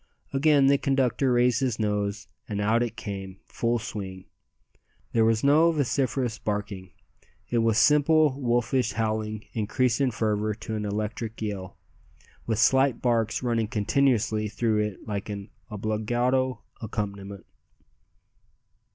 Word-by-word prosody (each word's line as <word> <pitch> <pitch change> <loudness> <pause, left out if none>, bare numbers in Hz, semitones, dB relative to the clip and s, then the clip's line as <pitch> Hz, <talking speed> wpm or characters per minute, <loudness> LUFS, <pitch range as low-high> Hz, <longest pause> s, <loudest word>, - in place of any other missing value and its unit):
Again 140 0 +4
the 140 0 +4
conductor 135 -1 +1
raised 120 -1 +3
his 125 -5 0
nose, 105 0 -2 0.2
and 105 -2 -2
out 110 +3 +2
it 120 -2 -2
came 95 -3 -6
full 120 0 -1
swing. 95 -5 -6 0.9
There 115 - +3
was 110 0 +2
no 155 +4 +5
vociferous 130 -5 -1
barking. 105 -3 -4 0.6
It 120 - +2
was 115 -1 +2
simple 150 0 +4
wolfish 120 0 +1
howling 110 -1 -2
increased 115 +3 0
in 135 - +3
fervour 110 -2 -1
to 110 0 -6
an 105 -1 -3
electric 105 +2 -4
yell, 100 -4 -5 0.7
with 110 -2 0
slight 130 +1 +3
barks 115 -1 0
running 115 -3 0
continuously 110 -1 +1
through 110 0 0
it 105 -1 -3
like 100 -1 -4
an 100 0 -6 0.2
obbligato 120 +4 -1 0.2
accompaniment. 100 -3 -5
110 Hz, 125 wpm, -26 LUFS, 105-125 Hz, 0.9 s, no